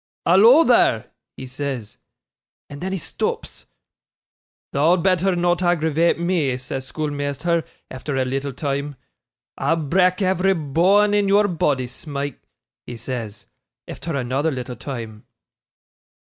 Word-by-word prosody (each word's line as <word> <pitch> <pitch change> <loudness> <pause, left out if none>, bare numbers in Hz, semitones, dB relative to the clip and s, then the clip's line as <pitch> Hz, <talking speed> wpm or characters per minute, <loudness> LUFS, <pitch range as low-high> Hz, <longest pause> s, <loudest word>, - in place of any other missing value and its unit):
"Hallo, 225 - +7
there," 125 - +3 0.3
he 130 - -7
says, 125 -4 -5 0.7
and 145 - -9
then 190 +1 -3
he 195 - -1
stops. 165 - -4 1.1
"Thou'd 165 +5 +3
betther 185 0 +2
not 175 0 +1
aggravate 165 -2 +2
me," 170 -7 0
says 130 +1 -6
schoolmeasther, 150 +2 -2 0.3
efther 135 +1 -3
a 130 - +1
little 135 +2 -2
time. 140 +1 -3 0.6
"I'll 145 +5 +2
brak' 180 +5 +2
every 190 +1 +2
boan 185 +7 +3
in 205 -1 +2
your 205 +1 +4
boddy, 145 -7 0
Smike," 140 +2 -6 0.5
he 120 - -6
says, 115 -3 -6 0.4
efther 165 -3 -5
another 135 +5 0
little 125 -3 -5
time. 115 -4 -7
150 Hz, 120 wpm, -21 LUFS, 130-180 Hz, 1.1 s, Hallo